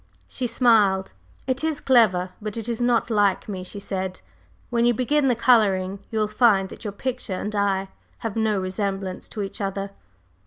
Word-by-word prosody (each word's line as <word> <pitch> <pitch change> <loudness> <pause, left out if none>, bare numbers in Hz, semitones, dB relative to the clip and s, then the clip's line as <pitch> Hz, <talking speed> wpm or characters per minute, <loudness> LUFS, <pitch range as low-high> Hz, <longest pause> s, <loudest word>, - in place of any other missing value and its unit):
She 255 - -3
smiled. 215 -5 +3 0.3
"It 260 +2 -1
is 315 -2 0
clever; 200 -10 +3
but 215 +1 -5
it 225 - -3
is 235 0 -2
not 240 -1 +2
like 205 -3 +2
me," 190 -3 -5
she 195 +3 -7
said. 190 -2 -4 0.5
"When 235 -1 +2
you 240 0 +3
begin 275 +4 +2
the 250 - +3
coloring 200 -6 +3
you 220 - -4
will 215 -1 +2
find 210 -3 +3
that - - -11
your 210 - -3
picture 250 -2 -4
and 210 +1 -4
I 195 -1 +1 0.4
have 220 - -2
no 220 -3 +1
resemblance 190 0 -3
to 210 - -4
each 195 +1 -6
other." 195 0 -3
210 Hz, 185 wpm, -24 LUFS, 195-235 Hz, 0.5 s, smiled